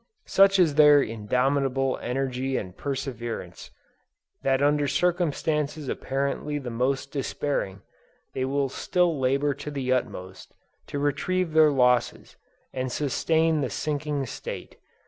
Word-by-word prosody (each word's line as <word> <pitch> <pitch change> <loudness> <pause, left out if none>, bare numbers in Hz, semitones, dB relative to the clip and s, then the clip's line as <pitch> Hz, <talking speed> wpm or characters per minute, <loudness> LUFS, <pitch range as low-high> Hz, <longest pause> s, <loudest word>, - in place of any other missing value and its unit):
Such 195 0 +5
is 170 -5 +4
their 150 -1 +7
indomitable 130 +4 0
energy 130 +1 -2
and 90 -2 -6
perseverance, 130 -4 -5 0.7
that 135 -1 +2
under 145 0 +2
circumstances 155 -2 0
apparently 140 +3 -2
the 130 -4 -5
most 130 +4 -1
despairing, 135 -8 -3 0.5
they 130 - -2
will 135 +1 0
still 170 +3 0
labor 140 +2 +1
to 140 +2 -7
the 135 -3 -1
utmost, 95 -7 -5 0.3
to - - -4
retrieve 165 +4 0
their 155 -1 +6
losses, 125 -3 +1 0.4
and 130 -1 -3
sustain 160 +3 +1
the 130 - -1
sinking 145 +3 -2
state. - - -7
140 Hz, 120 wpm, -26 LUFS, 130-150 Hz, 0.7 s, their